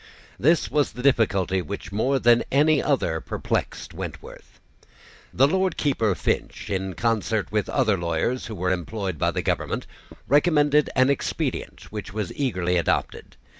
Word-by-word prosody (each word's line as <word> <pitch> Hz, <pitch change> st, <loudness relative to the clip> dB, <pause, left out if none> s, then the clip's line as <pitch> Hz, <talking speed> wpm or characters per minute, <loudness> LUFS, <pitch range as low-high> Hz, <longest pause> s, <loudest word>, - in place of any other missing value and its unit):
This 160 Hz, +5 st, +3 dB
was 145 Hz, -5 st, +1 dB
the 125 Hz, +2 st, -7 dB
difficulty 100 Hz, -8 st, +2 dB
which 90 Hz, +3 st, -7 dB
more 125 Hz, +7 st, +1 dB
than 120 Hz, -2 st, +4 dB
any 150 Hz, +2 st, +4 dB
other 90 Hz, -, 0 dB
perplexed -, -, -3 dB
Wentworth. -, -, -9 dB, 0.7 s
The 135 Hz, +3 st, +4 dB
Lord 185 Hz, +2 st, 0 dB
Keeper 115 Hz, -9 st, +1 dB
Finch, -, -, -2 dB
in 95 Hz, -1 st, -2 dB
concert 110 Hz, -3 st, 0 dB
with 105 Hz, -2 st, -1 dB
other 110 Hz, -8 st, +1 dB
lawyers 85 Hz, +9 st, -1 dB
who 110 Hz, -, -6 dB
were 90 Hz, -1 st, -1 dB
employed 95 Hz, -1 st, -3 dB
by -, -, +2 dB
the -, -, -2 dB
government, -, -, -2 dB, 0.4 s
recommended 150 Hz, 0 st, +3 dB
an 130 Hz, +1 st, +4 dB
expedient 140 Hz, -, -3 dB
which 105 Hz, -2 st, -6 dB
was 105 Hz, -4 st, -3 dB
eagerly 90 Hz, -10 st, 0 dB
adopted. 85 Hz, -, -1 dB
115 Hz, 145 wpm, -24 LUFS, 95-140 Hz, 0.7 s, than